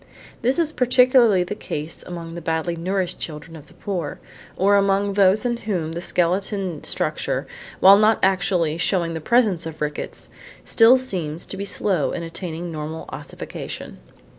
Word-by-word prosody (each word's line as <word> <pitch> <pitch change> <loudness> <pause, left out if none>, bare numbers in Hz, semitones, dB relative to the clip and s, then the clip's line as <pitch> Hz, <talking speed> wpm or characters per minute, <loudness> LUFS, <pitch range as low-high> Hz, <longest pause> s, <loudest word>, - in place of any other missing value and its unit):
This 255 +3 +2
is 320 -2 +1
particularly 250 -5 +4
the 180 - -4
case 150 +3 -5
among 170 -2 -7
the 170 - -6
badly 165 +1 -1
nourished 180 +1 -2
children 160 +1 -7
of 150 -2 -12
the - - -20
poor, 185 -6 -4 0.4
or 200 +2 +4
among 200 0 +2
those 200 +3 +3
in 240 -1 0
whom 185 -8 -3
the 170 +1 -5
skeleton 180 -1 -1
structure, - - -2 0.4
while 195 +2 +8
not 215 +1 +4
actually 180 -4 +1
showing 170 -1 0
the 160 - -4
presence 205 -5 +2
of 160 -1 -8
rickets, 150 0 -5 0.3
still 230 +3 +6
seems 175 -11 -3
to - - -7
be 200 +1 -4
slow 190 -5 0
in 170 - -4
attaining 165 0 -5
normal 155 +1 -5
ossification. 145 - -7
180 Hz, 160 wpm, -22 LUFS, 165-200 Hz, 0.4 s, while